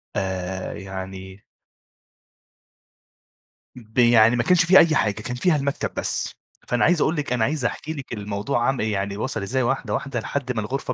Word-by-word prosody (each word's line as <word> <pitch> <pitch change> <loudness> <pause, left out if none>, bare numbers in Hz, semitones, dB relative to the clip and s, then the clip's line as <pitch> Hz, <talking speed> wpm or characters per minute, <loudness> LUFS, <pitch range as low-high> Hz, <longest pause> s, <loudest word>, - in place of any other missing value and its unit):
آآ، 95 -1 -3
يعني 95 0 -8 2.3
ب 115 -2 -15
يعني 120 -1 +6
ما 120 - +1
كانش 180 +2 +4
فيها 185 +2 +8
أي 160 -2 +4
حاجة 105 -7 +2
كان 120 +3 -4
فيها 165 +5 +2
المكتب 140 -1 -2
بس، - - -1 0.3
فأنا 125 0 +1
عايز 175 -2 +3
أقول 160 - +2
لِك 145 -5 -2
أنا 120 - +1
عايز 140 +1 -1
أحكي 155 +6 -3
لِك 135 -5 -7
الموضوع 105 +4 -2
عامل 135 -5 0
يعني 100 -1 -2
وَصَل 105 - -2
إزاي 130 +7 -1
واحدة، 120 -3 -1
واحدة 130 +1 -2
لحد 130 +2 -3
ما 110 - -2
الغرفة 130 +4 -3
120 Hz, 170 wpm, -23 LUFS, 100-140 Hz, 2.3 s, فيها